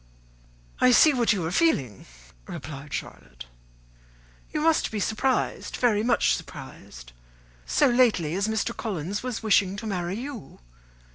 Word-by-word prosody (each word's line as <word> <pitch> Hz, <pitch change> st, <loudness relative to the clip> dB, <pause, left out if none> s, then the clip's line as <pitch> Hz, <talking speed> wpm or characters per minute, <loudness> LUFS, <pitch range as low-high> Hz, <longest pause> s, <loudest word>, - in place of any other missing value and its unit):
"I 255 Hz, -, +5 dB
see 295 Hz, +5 st, +6 dB
what 240 Hz, -3 st, +2 dB
you 190 Hz, -6 st, -1 dB
are 165 Hz, -, -2 dB
feeling," 140 Hz, -, 0 dB, 0.4 s
replied 140 Hz, 0 st, -8 dB
Charlotte; 60 Hz, -1 st, -7 dB, 1.1 s
"you 305 Hz, -, -2 dB
must 320 Hz, 0 st, +2 dB
be 215 Hz, -, -4 dB
surprised, 225 Hz, +6 st, -1 dB
very 225 Hz, -4 st, +2 dB
much 235 Hz, +1 st, +2 dB
surprised, -, -, -9 dB, 0.6 s
so -, -, +3 dB
lately 235 Hz, -, +2 dB
as 195 Hz, +3 st, 0 dB
Mr. 220 Hz, +2 st, -1 dB
Collins 200 Hz, -2 st, -4 dB
was 250 Hz, -3 st, -5 dB
wishing 200 Hz, -3 st, +3 dB
to 210 Hz, -, -7 dB
marry 180 Hz, -3 st, -3 dB
you. 260 Hz, -, -8 dB
210 Hz, 135 wpm, -25 LUFS, 170-245 Hz, 1.1 s, see